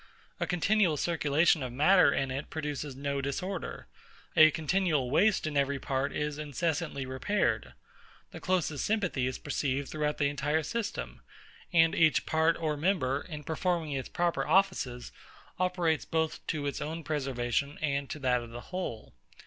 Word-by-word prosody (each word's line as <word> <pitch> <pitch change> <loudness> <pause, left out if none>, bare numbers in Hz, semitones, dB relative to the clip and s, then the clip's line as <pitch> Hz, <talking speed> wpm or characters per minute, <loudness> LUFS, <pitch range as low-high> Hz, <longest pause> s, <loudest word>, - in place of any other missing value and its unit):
A 175 - -1
continual 180 -1 +2
circulation 160 0 +2
of 130 -2 -3
matter 155 +5 +5
in 135 -1 -1
it 135 +3 -4
produces 150 -3 -4
no 140 0 -2
disorder: 175 +7 -4 0.5
a 155 0 +9
continual 155 -4 0
waste 200 +6 +3
in 155 -1 -3
every 140 0 +1
part 135 0 -1
is 150 0 -3
incessantly 150 -1 -2
repaired: 130 +11 -1 0.6
the - - -8
closest 170 -6 0
sympathy 180 - 0
is 130 - -3
perceived 140 -1 -2
throughout 150 -1 -1
the 145 - +1
entire 150 +2 0
system: 230 +8 -4 0.5
and 165 -1 +5
each 155 -2 +3
part 160 +1 +2
or 155 -2 -1
member, 145 -5 0
in 150 -4 -8
performing 165 0 -1
its 135 -2 -3
proper 175 -1 0
offices, 185 -11 +1 0.5
operates 180 -3 +1
both 160 -1 -2
to 150 -3 -2
its 140 - -3
own 160 +2 -4
preservation 140 -1 -1
and 140 -2 -1
to - - -4
that 125 -3 +1
of 120 - -9
the 120 +1 -8
whole. 180 -12 -5
150 Hz, 155 wpm, -30 LUFS, 140-170 Hz, 0.6 s, a